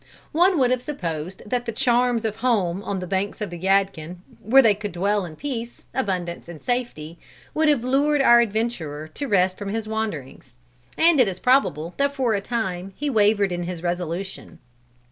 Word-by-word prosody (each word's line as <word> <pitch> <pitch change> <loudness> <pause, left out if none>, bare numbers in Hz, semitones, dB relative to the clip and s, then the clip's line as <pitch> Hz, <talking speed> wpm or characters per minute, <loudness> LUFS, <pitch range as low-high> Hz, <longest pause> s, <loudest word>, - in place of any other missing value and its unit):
One 355 +3 +4
would 255 -3 +3
have 255 -1 +1
supposed 180 - -5
that 245 +2 -2
the - - 0
charms 240 -1 +1
of 215 -1 -2
home 205 -7 +1
on 200 -1 -3
the 185 - -4
banks 195 +2 -2
of 210 -4 -4
the 175 - -7
Yadkin, 190 -3 0 0.3
where 265 +6 +6
they 220 -3 +5
could 205 -1 -6
dwell 200 +2 0
in 160 -3 -9
peace, 240 - -6
abundance 180 -8 -3
and 170 -3 -9
safety, 175 -10 -3 0.3
would 315 0 +2
have 280 -6 +2
lured 285 +3 +2
our 240 -3 +7
adventurer 200 -10 -2
to 280 - -5
rest 185 -4 +2
from 205 -1 -4
his 220 +1 -3
wanderings. 165 - -5 0.4
And 330 -2 +5
it 250 - +5
is 185 -2 -3
probable 185 - +2
that 280 0 +1
for 255 -5 +1
a 200 - 0
time, 195 -5 -3
he 295 0 -2
wavered 205 -3 +3
in 175 0 -3
his 175 -1 -6
resolution. 175 +2 -4
205 Hz, 185 wpm, -23 LUFS, 180-245 Hz, 0.4 s, our